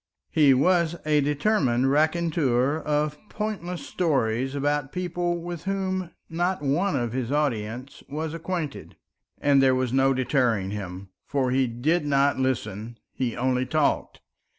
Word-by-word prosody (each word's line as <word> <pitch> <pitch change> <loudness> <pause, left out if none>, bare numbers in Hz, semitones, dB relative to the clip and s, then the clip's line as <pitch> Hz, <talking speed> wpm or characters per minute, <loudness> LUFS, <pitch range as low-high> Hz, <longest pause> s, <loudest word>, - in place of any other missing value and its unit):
He 145 -4 +5
was 170 +3 +3
a 150 -1 +3
determined 140 - +2
raconteur 155 -3 +2
of 150 -1 -1
pointless 185 -5 -4
stories 135 -6 0
about 145 0 0
people 175 -1 -2
with 170 0 -6
whom 190 -2 -1 0.2
not 175 0 -1
one 170 +8 +1
of 120 -2 -1
his 130 -1 -2
audience 130 -3 -2
was 155 +2 -3
acquainted. 165 -3 -4 0.4
And 140 -1 +4
there 130 -1 +4
was 130 -1 -1
no 135 0 +4
deterring 120 -7 +1
him, 95 -2 -6 0.2
for 130 -3 0
he 130 0 +2
did 145 +9 0
not 140 -1 +2
listen, 115 -3 -2 0.2
he 125 -3 -2
only 125 0 0
talked. 155 +1 0
145 Hz, 135 wpm, -25 LUFS, 130-165 Hz, 0.4 s, He